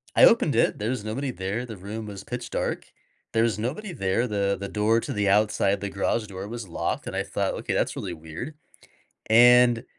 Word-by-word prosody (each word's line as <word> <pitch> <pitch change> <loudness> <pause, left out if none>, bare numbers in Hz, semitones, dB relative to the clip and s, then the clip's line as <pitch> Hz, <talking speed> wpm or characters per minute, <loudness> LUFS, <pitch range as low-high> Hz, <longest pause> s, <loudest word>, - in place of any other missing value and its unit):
I - - +6
opened - - +4
it, - - +2
there's 110 +1 -2
nobody 130 +5 -3
there, 100 +5 -3
the 110 -4 -8
room 105 +4 -6
was 100 -2 -8
pitch 120 +1 -6
dark. - - -2 0.5
There's 115 -2 +2
nobody 155 - -3
there, 105 +1 0
the 100 -2 0
the 100 - -4
door 110 +3 +2
to - - -4
the 105 -1 0
outside, 100 -1 +2
the 100 - -3
garage 105 +3 -1
door 95 0 -7
was 115 -2 -6
locked, 85 - -3
and - - -5
I 95 - 0
thought, 100 0 -2
"Okay, - - -3
that's - - 0
really 95 -3 -4
weird." 80 - -7 0.7
And 120 +1 +6
105 Hz, 200 wpm, -25 LUFS, 100-120 Hz, 0.7 s, I